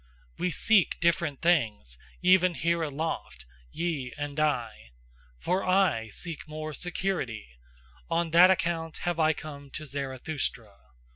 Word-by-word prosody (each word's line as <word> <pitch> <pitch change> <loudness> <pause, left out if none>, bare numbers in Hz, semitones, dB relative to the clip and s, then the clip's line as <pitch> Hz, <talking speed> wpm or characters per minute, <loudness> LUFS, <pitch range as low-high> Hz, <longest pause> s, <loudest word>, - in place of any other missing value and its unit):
We 180 - +1
SEEK 205 +2 +3
different 170 -4 +1
things 110 - +1 0.3
even 185 -1 +5
here 170 +1 +1
aloft, 145 - -4 0.3
ye 150 -8 -2
and 145 0 -4
I. 115 - -1 0.5
For 185 - 0
I 185 - +2
seek 160 - -6
more 155 0 -5
SECURITY; 130 - -3 0.5
on 165 0 0
that 175 +3 +8
account 165 -3 0
have 175 -1 -1
I 160 0 +4
come 145 -2 -9
to 155 +3 -7
Zarathustra. 135 -5 -4
155 Hz, 125 wpm, -28 LUFS, 135-175 Hz, 0.5 s, that